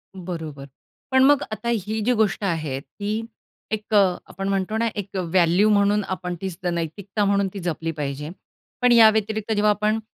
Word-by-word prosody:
बरोबर. 160 Hz, -6 st, -6 dB, 0.4 s
पण 260 Hz, 0 st, +5 dB
मग 285 Hz, +1 st, +5 dB
आता 215 Hz, +2 st, -3 dB
ही 220 Hz, -1 st, -1 dB
जी 250 Hz, -, +3 dB
गोष्ट 215 Hz, -2 st, +1 dB
आहे, 155 Hz, -7 st, -1 dB
ती 210 Hz, +9 st, -4 dB, 0.5 s
एक 215 Hz, 0 st, -4 dB
अ, -, -, +6 dB, 0.3 s
आपण 195 Hz, 0 st, -5 dB
म्हणतो 195 Hz, +2 st, -1 dB
ना 230 Hz, +1 st, +1 dB
एक 200 Hz, -2 st, -5 dB
अ, -, -, 0 dB
व्हॅल्यू 175 Hz, +3 st, +3 dB
म्हणून 205 Hz, 0 st, +3 dB
आपण 180 Hz, -1 st, -4 dB
ती 190 Hz, -, -2 dB, 0.2 s
नैतिकता 180 Hz, +5 st, -2 dB
म्हणून 200 Hz, 0 st, +2 dB
ती 200 Hz, -, -5 dB
जपली 165 Hz, -2 st, -3 dB
पाहिजे. 150 Hz, -1 st, -4 dB, 0.5 s
पण 250 Hz, -, +5 dB
या 230 Hz, -2 st, +8 dB
व्यतिरिक्त 220 Hz, 0 st, -1 dB
जेव्हा 210 Hz, 0 st, +2 dB
आपण 210 Hz, +1 st, 0 dB
200 Hz, 180 wpm, -23 LUFS, 175-215 Hz, 0.5 s, या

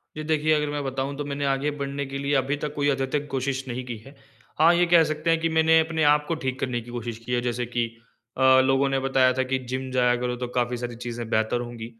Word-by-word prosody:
जी, 155 Hz, -, -5 dB
देखिए, 155 Hz, 0 st, +1 dB
अगर 150 Hz, -1 st, +1 dB
मैं 145 Hz, 0 st, -3 dB
बताऊँ 135 Hz, +1 st, -3 dB
तो 145 Hz, -, -4 dB
मैंने 140 Hz, 0 st, -3 dB
आगे 140 Hz, +2 st, 0 dB
बढ़ने 140 Hz, 0 st, -3 dB
के 135 Hz, 0 st, -6 dB
लिए 140 Hz, +1 st, -1 dB
अभी 135 Hz, +2 st, +1 dB
तक 150 Hz, 0 st, -4 dB
कोई 145 Hz, 0 st, +1 dB
अत्यधिक 140 Hz, +2 st, -1 dB
कोशिश 135 Hz, 0 st, -2 dB
नहीं 125 Hz, +1 st, -4 dB
की 120 Hz, -2 st, -6 dB
है। 135 Hz, +2 st, -14 dB, 0.4 s
हाँ, 165 Hz, +2 st, +6 dB
ये 175 Hz, +1 st, +4 dB
कह 170 Hz, -2 st, +7 dB
सकते 155 Hz, +1 st, -2 dB
हैं, 165 Hz, 0 st, +3 dB
कि 165 Hz, 0 st, 0 dB
मैंने 160 Hz, 0 st, +4 dB
अपने 160 Hz, 0 st, 0 dB
आप 150 Hz, 0 st, 0 dB
को 165 Hz, -, -1 dB
ठीक 130 Hz, 0 st, -2 dB
करने 125 Hz, -3 st, -2 dB
की 120 Hz, +1 st, -12 dB
कोशिश 120 Hz, -1 st, -5 dB
की -, -, -6 dB
है, 120 Hz, -, +1 dB
जैसे 120 Hz, 0 st, -2 dB
कि 120 Hz, -1 st, -1 dB, 0.5 s
अ, 130 Hz, 0 st, +6 dB
लोगों 135 Hz, +1 st, +2 dB
ने 135 Hz, -, 0 dB
बताया 130 Hz, -1 st, +3 dB
था 130 Hz, +1 st, 0 dB
कि 130 Hz, 0 st, -1 dB
जिम 130 Hz, +1 st, -3 dB
जाया 125 Hz, -1 st, +3 dB
करो, 125 Hz, 0 st, -2 dB
तो 125 Hz, 0 st, -4 dB
काफ़ी 125 Hz, 0 st, -1 dB
सारी 120 Hz, 0 st, -5 dB
चीज़ें 120 Hz, -1 st, -6 dB
बेहतर 110 Hz, +1 st, +1 dB
होंगी। 120 Hz, -2 st, -7 dB
135 Hz, 260 wpm, -25 LUFS, 125-145 Hz, 0.5 s, कह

